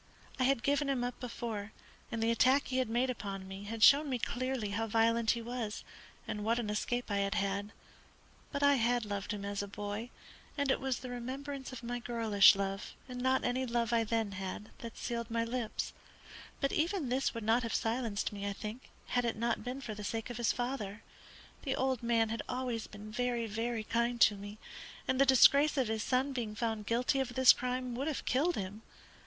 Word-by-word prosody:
I 255 - +3
had 265 -3 +2
given 285 0 +2
him 260 -3 0
up 245 0 -3
before, 225 -4 -5 0.4
and 230 -1 -1
the 230 - +3
attack 260 +5 +4
he 260 0 +2
made 245 +3 +1
upon 195 -5 -6
me 195 +1 -8
had 220 +1 -2
shown 285 +5 +7
me 255 - 0
clearly 245 -2 -2
how 225 +2 -1
violent 230 +1 +2
he 230 - -5
was, 230 -3 -4 0.4
and 210 -1 -3
what 230 +2 +2
an 220 -3 -1
escape 240 +2 -2
I 200 - +1
had 200 0 0
had; 200 +1 -1 0.8
but 280 -1 -2
I 285 -1 +6
had 240 0 +2
loved 200 -1 -3
him 205 -1 -4
as 200 0 -2
a 205 - -4
boy, 205 +3 -5 0.5
and 285 -1 +2
it - - +1
was 265 -2 -2
the 255 -1 -6
remembrance 265 +3 -5
of 250 -2 -8
my 245 +1 -3
girlish 225 -5 +5
love, 195 0 -3
and 250 -1 -6
not 260 +1 +2
any 250 +1 0
love 235 -1 0
I 230 -1 +4
then 225 -1 0
had, 195 +2 -6
that 230 -1 -8
sealed 235 -1 -3
my 230 0 0
lips; 235 -1 -3 0.7
but 275 - +1
even 330 -3 0
this 260 0 0
would 230 - -4
not 225 +3 +3
have 230 -2 -2
silenced 225 -3 -1
me, 200 0 -4
I - - -2
think, 215 +5 -7 0.2
had 245 - +2
it 235 -1 0
not 235 +2 -1
been 255 +2 -4
for 235 -4 -5
the 210 0 -7
sake 225 +3 -3
of 240 - -6
his 235 -2 +2
father. 240 -5 -3 0.6
The 270 -2 -1
old 260 -2 0
man 230 -1 +2
had 225 +1 -2
always 250 -3 -2
been 210 +1 -10
very, 240 +1 0
very 225 +1 -2
kind 235 +2 0
to 215 - +7
me, 205 +1 -8 0.5
and 260 +1 +2
the 275 - +5
disgrace 280 +3 +6
of 255 -5 +2
his 220 -1 -1
son 260 +4 +1
being 225 -4 -3
found 220 -2 -2
guilty 245 +3 +2
of 250 -2 -2
this 260 -1 +8
crime 250 0 -2
would 265 +5 -2
have 310 - -2
killed 315 +7 +2
him. 200 +2 -5
235 Hz, 210 wpm, -33 LUFS, 215-255 Hz, 0.8 s, this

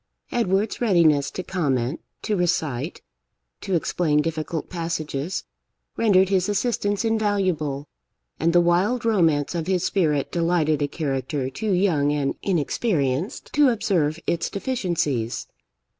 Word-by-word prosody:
Edward's 210 -2 0
readiness 160 -10 +4
to 185 - -5
comment, 140 -6 -1 0.2
to 215 - 0
recite, 165 -8 -1 0.6
to 190 - -1
explain 155 -2 +1
difficult 160 +1 -2
passages, 165 -2 -3 0.5
rendered 190 -4 +4
his 190 0 +1
assistance 205 -1 0
invaluable; 185 -10 0 0.5
and 165 - +2
the 175 +1 +5
wild 190 +8 +2
romance 165 -10 +2
of 165 -2 -3
his 185 -2 +1
spirit 155 -9 +1
delighted 165 -3 +1
a 145 - +2
character 135 -2 -2
too 210 +7 -1
young 170 -6 +2
and 145 -2 0
inexperienced 170 - -1
to 290 -2 +5
observe 170 -9 0
its 170 0 0
deficiencies. 170 - -1
170 Hz, 120 wpm, -24 LUFS, 150-195 Hz, 0.6 s, the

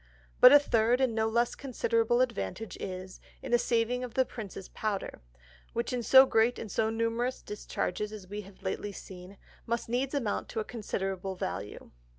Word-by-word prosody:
But 250 - +10
a 290 - +10
Third, 240 -3 +2
and 260 -3 +2
no 220 0 +1
less 235 +2 +1
considerable 240 -2 +1
Advantage 215 - -2
is, 185 0 -7 0.2
in 265 - -6
the 240 - +5
saving 235 +1 +1
the 250 +1 0
Prince's 200 -6 -8
Powder, 210 -3 -4 0.5
which 235 +2 -2
in 245 - -1
so 265 +4 +8
great 225 -1 +2
and 220 - -7
so 220 - +1
numerous 230 +3 -1
Discharges, 210 0 -3
as 210 -3 -9
we 205 +2 -5
have 195 -1 -16
lately 200 +1 -3
seen, 185 +1 -11 0.3
must 235 0 -2
needs 260 +4 -1
amount 235 -8 -1
to 225 - -3
a - - -1
considerable 195 -4 -4
Value. 95 - -5
225 Hz, 170 wpm, -30 LUFS, 200-245 Hz, 0.5 s, But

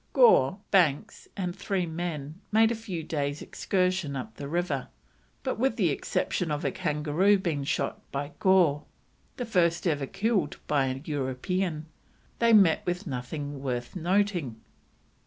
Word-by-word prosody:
Gore, 190 - +5
Banks, 180 +1 +2
and 180 -2 -2
three 195 -2 -1
men 160 -1 -5
made 220 +1 +5
a - - +2
few 205 -8 -5
days' 145 -2 -2
excursion 180 -6 -1
up 130 -4 -5
the 140 - -6
river, 175 +4 -1 0.6
but, 260 -4 -2
with 260 -1 +2
the 185 -9 +2
exception 170 +4 -1
of 150 -1 -2
a 135 - +1
kangaroo 150 +9 +2
being 165 -7 -2
shot 140 - -2
by 140 +1 -3
Gore, 180 -7 +4 0.5
the 245 - -3
first 175 -6 +1
ever 145 -5 0
killed 200 - 0
by 140 -3 +2
a 130 +1 -3
European, 155 +4 -2 0.5
they 235 0 +4
met 195 -7 +5
with 180 +2 -2
nothing 140 +1 -5
worth 125 0 -3
noting. 180 - 0
165 Hz, 145 wpm, -28 LUFS, 145-190 Hz, 0.6 s, Gore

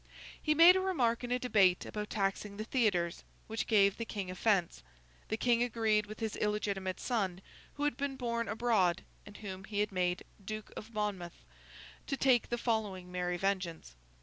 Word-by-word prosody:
He 305 -1 +2
made 340 +4 +9
a - - +3
remark 255 -12 +1
in 245 - -4
a 250 - +3
debate 200 -8 +3
about 210 0 -5
taxing 200 0 -2
the 215 - -3
theatres, 205 -8 0 0.2
which 225 0 -3
gave 200 -3 +4
the 230 - -3
King 200 -5 -5
offence. 185 - +1 0.5
The 220 - -2
King 235 0 +2
agreed 220 -3 +1
with 215 +2 -9
his 220 -2 -2
illegitimate 200 -3 -1
son, 195 -7 -1 0.4
who 290 - -4
had 295 -4 0
been 280 -1 -2
born 235 -2 -2
abroad, 210 -5 +1 0.2
and 205 - -11
whom 190 -3 -7
he 205 0 -4
had 210 0 +1
made 180 -1 0 0.2
Duke 215 +2 -6
of 220 - -8
Monmouth, 205 -5 -4 0.6
to 275 - -1
take 255 -4 +3
the 240 - -1
following 210 -6 -2
merry 180 -1 -1
vengeance. 180 - -2
210 Hz, 175 wpm, -33 LUFS, 190-235 Hz, 0.6 s, made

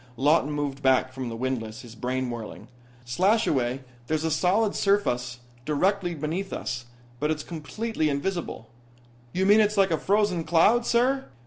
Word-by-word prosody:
Lawton 145 +2 +3
moved 145 -2 -3
back 130 -1 +2
from 130 -2 -5
the 115 - -5
windlass, 115 -3 -3
his 120 -2 -12
brain 125 +2 -2
whirling. 115 0 -8 0.4
"Slashaway 135 - +1 0.3
there's 155 +1 0
a 160 - 0
solid 195 +7 +2
surface 125 -12 0 0.2
directly 175 +5 0
beneath 165 +6 -3
us, 120 -1 -4 0.3
but 150 - 0
it's 155 -1 -1
completely 170 +2 -3
invisible." 150 -4 -3 0.6
"You 190 +6 0
mean 205 +2 +6
it's 210 0 +2
like 195 -2 +4
a 160 - +1
frozen 200 -4 +1
cloud, 190 +9 +3
sir?" 260 +3 +2
155 Hz, 150 wpm, -26 LUFS, 130-195 Hz, 0.6 s, mean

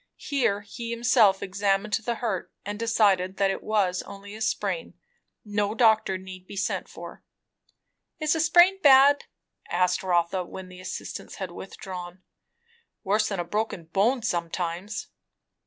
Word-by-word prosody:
Here 235 -8 0
he 230 +3 -7
himself 230 -4 +3
examined 195 +1 0
the 235 +2 0
hurt, 220 -6 -3
and 205 +1 -5
decided 200 -5 +2
that 195 -1 +2
it - - -4
was 195 -4 +1
only 200 +1 -10
a 220 - -9
sprain; - - -2 0.5
no 205 0 -1
doctor 220 -5 +3
need 185 0 -11
be - - -9
sent 195 - -2
for. - - -10 1.0
"Is 310 -2 +2
a 325 - -1
sprain 350 +4 +5
bad?" 280 0 +7 0.4
asked 180 +1 +1
Rotha, 180 0 +1
when 185 +1 -9
the 185 0 -12
assistants 185 - -7
had 190 -2 -5
withdrawn. 180 0 -8 0.8
"Worse 210 +3 +2
than 195 -3 -3
a - - 0
broken 205 0 -2
bone, 215 +9 +1
sometimes." 175 +1 -3
200 Hz, 140 wpm, -26 LUFS, 185-225 Hz, 1.0 s, bad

